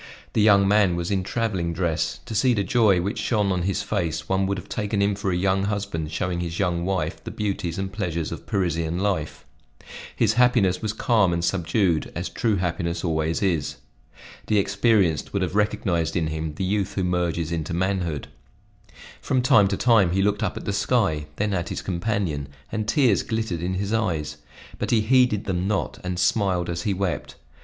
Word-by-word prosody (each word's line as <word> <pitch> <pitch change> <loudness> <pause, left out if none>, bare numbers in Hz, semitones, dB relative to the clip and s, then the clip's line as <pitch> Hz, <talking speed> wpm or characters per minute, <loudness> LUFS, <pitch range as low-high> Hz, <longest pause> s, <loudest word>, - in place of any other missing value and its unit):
The 110 - +2
young 100 -2 +5
man 100 -3 +4
was 85 +1 -3
in 95 -1 +1
traveling 95 -4 -2
dress; 85 -2 -1
to 120 - -6
see 120 +3 +3
the 100 - +1
joy 110 -7 +3
which 100 +5 -3
shone 105 -4 +1
on 90 -1 0
his 95 +2 -1
face, 90 -7 -2
one 95 0 +1
would 100 0 -1
have 90 - -8
taken 105 -1 -2
him 100 0 +2
for 100 0 -2
a - - 0
young 95 +2 +1
husband 100 -7 -3
showing 90 0 -2
his 85 -1 -4
young 85 -3 0
wife 80 -4 -2
the - - -6
beauties 95 -5 -3
and 95 0 -3
pleasures 85 -6 -2
of - - -7
Parisian 85 -3 -1
life. 95 -6 -2 0.7
His 110 -2 +2
happiness 115 -7 +3
was 110 - -1
calm 110 -4 +2
and 85 0 0
subdued, 85 -2 +1
as 85 +2 -3
true 110 +5 0
happiness 85 -2 -2
always 80 0 0
is. 85 -7 0 0.7
The 105 - +2
experienced 100 -4 +2
would 100 -2 0
have 90 - -2
recognized 90 -5 0
in 80 - +1
him 80 -1 -4
the 95 - -3
youth 100 +1 -1
who 95 - 0
merges 85 -2 -1
into 80 0 -3
manhood. 90 -4 -1 0.9
From 130 -2 0
time 105 -5 +5
to 100 0 -1
time 105 -8 +4
he 95 +1 +2
looked 105 +1 +1
up - - -1
at - - -7
the 100 - -1
sky, 95 -10 +1
then 105 +3 -1
at 90 -3 -2
his - - -4
companion, 90 -6 -2 0.2
and 110 -1 -2
tears 120 -4 +3
glittered 110 -7 -2
in 90 +2 -2
his 100 +3 -2
eyes, 90 -10 -1 0.4
but - - -2
he 115 -2 +3
heeded 120 -2 +3
them 95 -1 -1
not, 105 -2 -1
and 90 0 -3
smiled 90 -2 +1
as 85 0 -3
he 100 +2 0
wept. 95 -2 -3
95 Hz, 195 wpm, -24 LUFS, 85-105 Hz, 0.9 s, young